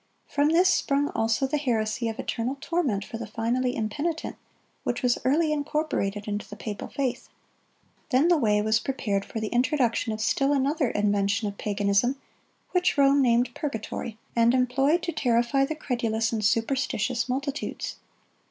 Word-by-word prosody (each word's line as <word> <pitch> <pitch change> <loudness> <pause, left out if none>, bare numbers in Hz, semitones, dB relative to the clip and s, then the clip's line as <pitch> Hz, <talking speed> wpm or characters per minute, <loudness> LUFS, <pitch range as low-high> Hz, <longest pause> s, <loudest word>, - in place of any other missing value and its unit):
From 290 +1 +1
this 345 +3 +4
sprung 285 -5 +2
also 225 +4 +1
the 290 +3 -1
heresy 230 -3 0
of 225 - -5
eternal 255 +1 -2
torment 270 - -1
for 225 - -7
the 230 - -5
finally 245 +3 -1
impenitent, 290 +10 -2 0.5
which 245 - -2
was 245 -1 +2
early 305 +4 +2
incorporated 285 -9 -2
into 205 0 -4
the 210 - -8
papal 210 -1 -6
faith. 255 -3 -3 0.8
Then 275 +3 +4
the 350 - +5
way 210 -6 +2
was 220 +1 +3
prepared 215 -7 -2
for 225 - -6
the 220 -1 -3
introduction 245 -2 +1
of 215 - -4
still 275 +5 +2
another 280 0 +1
invention 205 +1 +1
of 200 0 -7
paganism, 205 +5 +1 0.5
which 360 -3 +2
Rome 280 0 +5
named 240 -1 +2
purgatory, 225 -5 -4 0.2
and 235 +1 +4
employed 270 +6 +2
to 340 - -1
terrify 250 -1 +2
the 315 - -4
credulous 230 -6 -1
and 220 -1 -1
superstitious 235 +1 0
multitudes. 275 +3 -3
245 Hz, 155 wpm, -26 LUFS, 220-280 Hz, 0.8 s, the